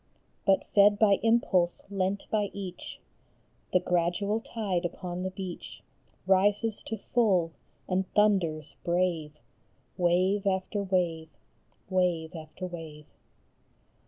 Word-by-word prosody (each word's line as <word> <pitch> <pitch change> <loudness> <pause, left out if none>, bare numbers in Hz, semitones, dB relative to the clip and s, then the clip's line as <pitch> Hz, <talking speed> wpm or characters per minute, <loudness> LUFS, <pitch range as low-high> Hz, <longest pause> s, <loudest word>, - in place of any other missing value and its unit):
But 195 -1 +4
fed 205 0 +6
by 205 -2 +4
impulse 200 -6 +2
lent 195 0 -1
by 210 -2 +1
each 190 -3 -7 0.7
The 185 - +4
gradual 180 +4 0
tide 210 -6 -2
upon 175 0 -4
the 185 - -2
beach 185 -1 -7 0.4
Rises 205 +3 +3
to 220 - -3
full, 195 -7 +1 0.4
and 185 0 -1
thunders 170 -8 +2
brave, 170 -4 0 0.6
Wave 185 +3 +2
after 190 +2 0
wave, 175 -4 0 0.6
wave 180 -3 0
after 160 +3 -7
wave. 160 -4 -9
185 Hz, 105 wpm, -29 LUFS, 175-200 Hz, 0.7 s, fed